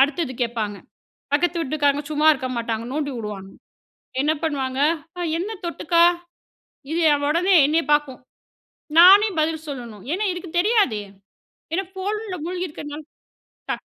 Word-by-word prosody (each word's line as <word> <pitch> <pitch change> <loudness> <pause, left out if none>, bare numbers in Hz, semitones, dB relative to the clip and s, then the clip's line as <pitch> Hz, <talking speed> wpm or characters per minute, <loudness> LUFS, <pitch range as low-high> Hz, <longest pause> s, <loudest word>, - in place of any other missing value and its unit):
அடுத்தது 285 +1 +2
கேட்பாங்க, 225 -4 -2 0.6
பக்கத்து 345 +3 +1
வீட்டுக்காரங்க 290 0 0
சும்மா 305 +1 +2
இருக்க 265 -3 -4
மாட்டாங்க 230 -1 -3
நோண்டி 290 -2 -2
விடுவாங்க, 205 -4 -6 0.7
என்ன 300 +2 +2
பண்ணுவாங்க? 270 -4 -2 0.4
அ - - -4 0.2
"என்ன 380 +5 -3 0.2
தொட்டுக்கா?" 340 0 +2 0.9
இது 330 - 0 0.3
உடனே 360 +5 +3
என்னைய 320 +3 +2
பாக்கும், 295 -3 0 0.8
நானே 395 +5 +8
பதில் 315 0 -2
சொல்லணும், 235 -8 -8
ஏன்னா 410 +4 -1
இதுக்கு 350 -2 -8
தெரியாது, 390 - +2 0.7
ஏன்னா 385 +3 0
ஃபோன்ல 410 +1 -4
மூழ்கியிருக்கிறதுனால 315 -4 -5 0.7
டக் - - -3
305 Hz, 120 wpm, -22 LUFS, 260-350 Hz, 0.9 s, நானே